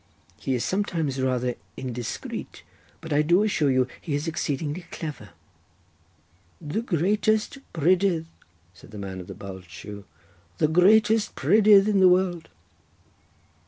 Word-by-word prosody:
He 135 - -1
is 120 - -2
sometimes 165 -9 -1
rather 125 -1 0 0.2
indiscreet, 125 -3 -6 0.4
but 160 -2 -4
I 145 - +4
do 175 +6 +3
assure 160 -9 +1
you 130 -1 +2
he 150 -5 -3
is 145 +3 -3
exceedingly 155 +1 -3
clever." 145 -10 -7 1.3
"The 170 +7 -3
greatest 210 - 0
prydydd," 175 +1 +2 0.5
said 90 - -17
the 105 - -10
man 95 -2 -6
of 90 - -12
the - - -8
bulged 95 -3 -10
shoe, 100 +4 -9 0.5
"the 155 - +3
greatest 210 +6 +4
prydydd 205 +5 +5
in 205 -2 +2
the 185 -1 +7
world." 180 -2 +1
160 Hz, 130 wpm, -25 LUFS, 130-190 Hz, 1.3 s, the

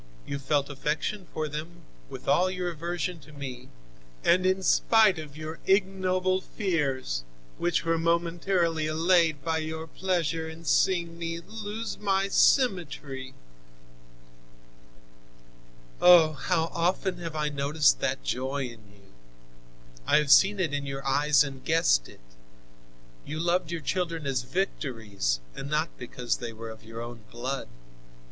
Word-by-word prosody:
You 140 - -4
felt 140 0 +1
affection 150 +7 -3
for 155 -1 -2
them, 155 +4 -7 0.3
with - - -9
all 185 +1 +4
your 180 -1 -2
aversion 175 +1 -3
to 155 - -16
me, 130 -3 -8 0.5
and 185 +2 +4
in 190 0 +1
spite 215 -3 +4
of 150 -2 -9
your 155 +1 -6
ignoble 185 -1 +2
fears, 140 - -1 0.4
which 175 -1 0
were 165 0 +1
momentarily 170 -1 +1
allayed 160 -2 +2
by 160 -1 +1
your 160 0 -4
pleasure 165 -2 -1
in 160 +1 -11
seeing 170 0 +2
me 165 0 -3
lose 215 +4 -6
my 195 -1 +1
symmetry. 150 - +1 2.7
"Oh! 175 -3 +8
how 165 +1 0
often 180 +1 0
have 165 -2 -6
I 150 -1 0
noticed 145 +1 +2
that - - -1
joy 130 - -2
in 115 -4 -9
you! 100 -1 -21 1.0
I - - +5
have 150 -2 +2
seen 195 +5 +6
it 165 -6 0
in 140 -1 -2
your 135 0 -5
eyes 145 +1 +4
and 135 -2 -7
guessed 155 - +2
it. - - -16 1.0
You 155 +2 -5
loved 175 0 +1
your 170 -1 -3
children 165 -1 -2
as 135 -2 0
victories, 115 - -2
and 140 - -6
not 155 +2 +1
because 125 -1 -3
they 120 -2 -6
were 115 +1 -7
of 110 - -13
your 115 +1 -8
own 120 0 -8
blood. 130 +3 -4
160 Hz, 140 wpm, -27 LUFS, 140-180 Hz, 2.7 s, Oh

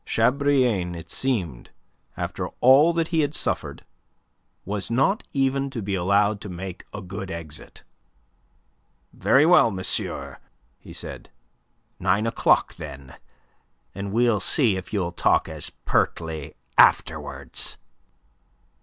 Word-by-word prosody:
Chabrillane, 125 -7 +1
it 85 0 -10
seemed, 95 - -2 0.5
after - - -3
all 135 +6 +6
that 165 -1 -1
he 165 - +1
had 145 0 0
suffered, - - -2 0.8
was 100 0 -3
not 135 - +2
even 135 0 0
to 135 -3 -6
be 100 -2 -3
allowed 100 +3 +2
to 105 - -7
make 90 0 -7
a - - -7
good 95 +1 -7
exit. 80 -4 -8 1.3
"Very 140 +3 +4
well, 175 -7 +6
monsieur," 95 -3 -2 0.4
he - - -13
said. - - -8 0.7
"Nine 95 +4 +1
o'clock, 115 - +2
then; 65 -1 -9 0.8
and 100 +1 -5
we'll 115 -1 +2
see 110 - +3
if 95 0 -7
you'll 95 -5 -1
talk 85 - +2
as 80 -2 -5 0.2
pertly 80 -2 -1 0.2
afterwards." - - +2
105 Hz, 120 wpm, -24 LUFS, 90-135 Hz, 1.3 s, all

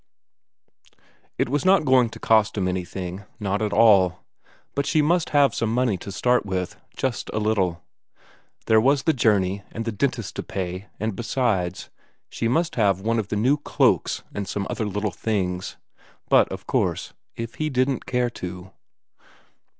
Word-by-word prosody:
It - - +1
was 145 +3 0
not 190 -3 +4
going 130 -3 +4
to - - -11
cost 110 -1 +3
him 95 -2 +1
anything, 90 +1 -4 0.2
not 100 0 -1
at 105 -1 0
all. 100 -5 +5 0.5
But 140 0 -1
she 155 - +2
must 165 +3 +2
have 145 -2 +4
some 115 -1 -1
money 120 -3 +1
to 100 - -8
start 125 +5 +2
with, 95 -2 -3 0.2
just 130 -3 -2
a - - -3
little; 100 -6 0 0.8
there 110 -1 +5
was 135 +3 +3
the 160 - +3
journey, 100 -6 +2
and 115 - -5
the 115 - -1
dentist 115 -1 -2
to - - -1
pay, 95 +1 -5
and 110 0 -2
besides, 100 -6 -1 0.4
she 115 - -1
must 160 +6 0
have 100 -4 +2
one 115 +2 0
of 105 - -3
the 105 - -3
new 125 +8 +3
cloaks 145 - +1
and 100 -1 -4
some 100 -1 -3
other 110 -3 -2
little 105 +1 -2
things. 95 -5 -2 0.5
But, - - +5
of - - -7
course, - - -1 0.2
if 115 0 -5
he 155 - +1
didn't 130 -1 0
care 125 -1 0
to.... 90 -2 -7
110 Hz, 165 wpm, -24 LUFS, 95-125 Hz, 0.8 s, all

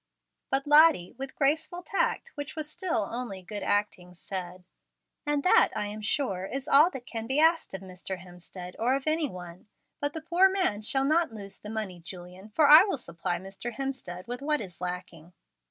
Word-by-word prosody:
But 270 +1 +1
Lottie, 295 - +6
with 270 0 -6
graceful 315 +5 0
tact, 470 +5 -1
which 290 0 -6
was 310 -1 -4
still 305 - -2
only 225 -6 -5
good 205 +3 -6
acting, 185 -3 -1
said: 180 0 -6 0.6
"And 295 -1 +1
that, 455 +5 +5
I - - -1
am 210 +1 -6
sure, 200 -4 -1
is 270 +5 -5
all 305 +3 +6
that 265 -7 -8
can 225 -2 -5
be 265 +4 +1
asked 325 - +3
of 190 - -6
Mr. 185 0 -6
Hemstead 180 0 -10
or 245 +4 +2
of 275 - -4
any 310 -1 +1
one. 180 0 -10 0.3
But 290 0 -1
the 320 - -5
poor 345 +4 +4
man 365 - 0
shall 270 +5 +1
not 320 0 +2
lose 200 -2 -9
the 210 - -9
money, 210 -5 -4
Julian, 180 +3 -10
for 290 +8 +3
I 300 +4 +10
will 390 -7 -1
supply 175 -7 -3
Mr. 195 +6 -7
Hemstead 225 -9 -5
with 245 +2 -5
what 300 +1 +1
is 185 -4 -8
lacking." 180 -2 -6
230 Hz, 190 wpm, -28 LUFS, 185-300 Hz, 0.6 s, I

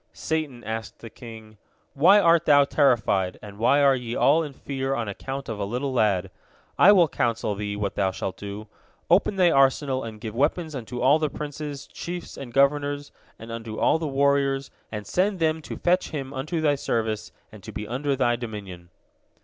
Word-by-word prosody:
Satan 155 -6 -3
asked 110 +1 -5
the 115 - -11
king: 110 -3 -12 0.3
"Why 180 +9 +6
art 170 -3 +4
thou 145 -2 +6
terrified, 110 -11 +2
and 100 -1 -11
why 140 +5 +4
are 135 -1 +5
ye 120 -2 -5
all 155 +4 +4
in 150 -3 -5
fear 135 0 -3
on 115 -3 -3
account 135 +7 -6
of 110 -2 -5
a - - -1
little 125 +7 -3
lad? 100 -6 +1 0.4
I 200 - +7
will 180 -5 +6
counsel 115 -6 -1
thee 105 0 -4
what 105 0 -2
thou 95 -2 +1
shalt 95 0 -4
do: 105 +1 -7 0.4
Open 195 +3 +4
thy 180 -3 +4
arsenal 135 -1 +2
and 110 -2 -8
give 110 -1 -6
weapons 155 +5 0
unto 125 -2 -6
all 140 +5 +5
the 155 -1 0
princes, 145 -1 -6
chiefs, 175 0 -7
and 125 -3 -8
governors, 145 +2 +1 0.3
and 115 +1 -10
unto 115 -1 -6
all 160 - +2
the 160 - -3
warriors, 140 -1 +1 0.2
and 105 -1 -5
send 195 +2 0
them 160 -1 0
to - - -7
fetch 180 +1 +1
him 135 -3 -5
unto 155 +5 -3
thy 150 -2 +3
service 110 -6 -2 0.2
and 110 - -13
to 110 - -9
be 105 +1 -6
under 135 +4 -1
thy 120 -2 +2
dominion." 100 -7 -8
135 Hz, 190 wpm, -25 LUFS, 110-145 Hz, 0.4 s, I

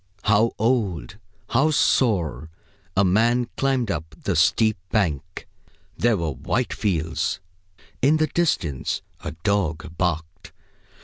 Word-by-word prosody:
How 110 +2 +3
old, 105 -6 0 0.3
how 135 +6 +3
sore 85 - +1 0.5
a 100 - +5
man 115 +6 +3
climbed 130 -5 +1
up 80 -2 -5
the 100 - 0
steep 110 +6 +3
bank! 85 -11 -1 0.5
There 115 -2 +2
were 85 -3 -1
white 105 - -2
fields. 80 -4 -1 0.6
In 145 +5 +4
the 155 - +3
distance 135 - -1 0.2
a 80 - -4
dog 90 -5 -1
barked. 85 +1 -2
100 Hz, 115 wpm, -23 LUFS, 80-120 Hz, 0.6 s, a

